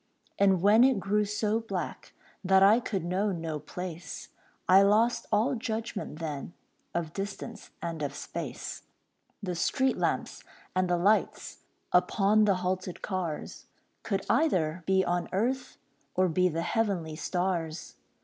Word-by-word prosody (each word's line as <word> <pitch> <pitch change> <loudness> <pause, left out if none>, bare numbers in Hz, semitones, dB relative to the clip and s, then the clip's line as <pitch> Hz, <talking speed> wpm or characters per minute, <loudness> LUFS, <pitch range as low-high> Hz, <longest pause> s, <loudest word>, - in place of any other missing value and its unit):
And 190 -3 +4
when 215 +4 +7
it 260 -5 +4
grew 210 +2 +1
so 210 +1 0
black 200 -5 -5 0.3
That 190 0 +5
I 210 +4 +7
could 195 -8 -3
know 190 +4 0
no 165 -4 -3
place, 175 +3 -7 0.4
I 190 +1 +8
lost 215 +4 +3
all 225 +7 +3
judgment 225 - -4
then, 155 0 -5 0.4
Of 165 -2 -2
distance 200 +1 -6
and 165 -2 -4
of 140 -1 -3
space. - - -6 0.6
The 180 -2 -2
street 260 +9 +1
lamps, - - -1 0.3
and 185 -1 +2
the 175 - +2
lights 200 +5 +1 0.3
Upon 200 +4 +4
the 200 -2 +3
halted 185 -1 -2
cars, 180 -6 -4 0.3
Could 195 -2 -2
either 180 - +2
be 190 0 +3
on 175 0 -1
earth 245 +7 -1 0.4
Or 185 0 +3
be 180 +2 +2
the 165 0 -2
heavenly 175 -5 -1
stars. 175 -1 -2
190 Hz, 140 wpm, -29 LUFS, 175-210 Hz, 0.6 s, I